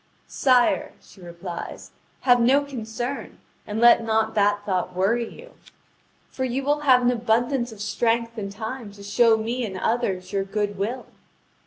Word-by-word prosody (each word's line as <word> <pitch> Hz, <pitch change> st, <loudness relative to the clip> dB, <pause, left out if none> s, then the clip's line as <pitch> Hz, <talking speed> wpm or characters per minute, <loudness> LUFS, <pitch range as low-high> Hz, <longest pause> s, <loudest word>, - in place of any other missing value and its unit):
"Sire," 250 Hz, -3 st, +2 dB
she 195 Hz, -, -18 dB
replies, 170 Hz, 0 st, -8 dB, 0.3 s
"have 245 Hz, -2 st, +4 dB
no 265 Hz, +5 st, +4 dB
concern, 245 Hz, -1 st, -5 dB, 0.3 s
and 210 Hz, +1 st, -3 dB
let 235 Hz, 0 st, +6 dB
not 220 Hz, 0 st, +1 dB
that 205 Hz, -1 st, +1 dB
thought 185 Hz, -2 st, -2 dB
worry 225 Hz, +5 st, +1 dB
you! -, -, -13 dB, 0.8 s
For 260 Hz, -, -4 dB
you 260 Hz, +1 st, -1 dB
will 290 Hz, +2 st, +1 dB
have 260 Hz, -4 st, +4 dB
an 245 Hz, -, +4 dB
abundance 240 Hz, +2 st, 0 dB
of 215 Hz, -2 st, -11 dB
strength 230 Hz, +2 st, 0 dB
and 200 Hz, -3 st, -5 dB
time 220 Hz, +2 st, -6 dB
to 200 Hz, 0 st, -13 dB
show 220 Hz, +3 st, +4 dB
me 235 Hz, +3 st, -2 dB
and 195 Hz, -4 st, -4 dB
others 190 Hz, -4 st, -1 dB
your 195 Hz, -1 st, +1 dB
good 205 Hz, +1 st, -2 dB
will. 230 Hz, +6 st, -3 dB
225 Hz, 160 wpm, -24 LUFS, 205-245 Hz, 0.8 s, let